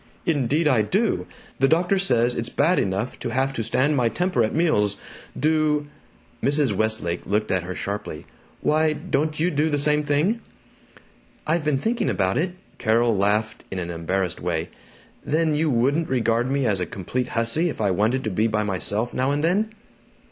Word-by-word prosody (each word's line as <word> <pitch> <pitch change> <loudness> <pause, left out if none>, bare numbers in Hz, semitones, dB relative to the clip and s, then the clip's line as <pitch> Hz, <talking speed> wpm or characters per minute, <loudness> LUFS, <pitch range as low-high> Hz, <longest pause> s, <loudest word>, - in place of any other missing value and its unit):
"Indeed 150 0 +1
I 130 -7 +4
do! 200 - 0 0.3
The 135 - +4
doctor 175 +5 +2
says 120 -9 +3
it's 115 0 -2
bad 165 +6 +2
enough 100 +5 -2
to - - -4
have 135 +3 0
to 115 - -3
stand 130 +6 +1
my 120 -4 +2
temper 180 +8 0
at 110 - 0
meals. 150 - +1 0.4
Do 155 -1 +2 0.3
" - - -32
Mrs. 140 -5 +2
Westlake 110 -5 -1
looked 105 +1 0
at 95 - +1
her 90 +1 -6
sharply. 100 -6 -5 0.4
"Why, 155 0 +2
don't 155 -1 -2
you 175 +3 +2
do 150 +1 +1
the 145 - 0
same 150 +1 +2
thing?" 155 +11 +1 1.0
"I've 165 +1 +1
been 150 -2 +1
thinking 225 - 0
about 95 +3 +1
it." 175 +2 -1 0.3
Carol 115 +1 +2
laughed 105 +3 0
in 95 - -5
an 85 -1 -3
embarrassed 90 +2 -2
way. 85 -1 -2 0.5
"Then 155 +1 +1
you 155 +1 +1
wouldn't 140 +6 +1
regard 120 -1 +1
me 140 -1 0
as 105 -5 +2
a 90 - -2
complete 120 +9 -3
hussy 115 +10 +3
if - - -6
I 100 -3 +1
wanted 110 +8 +1
to 110 - -2
be 110 +5 +1
by 105 -1 0
myself 105 +3 -2
now 130 +1 0
and 145 +1 0
then?" 205 +6 +1
130 Hz, 185 wpm, -23 LUFS, 105-155 Hz, 1.0 s, I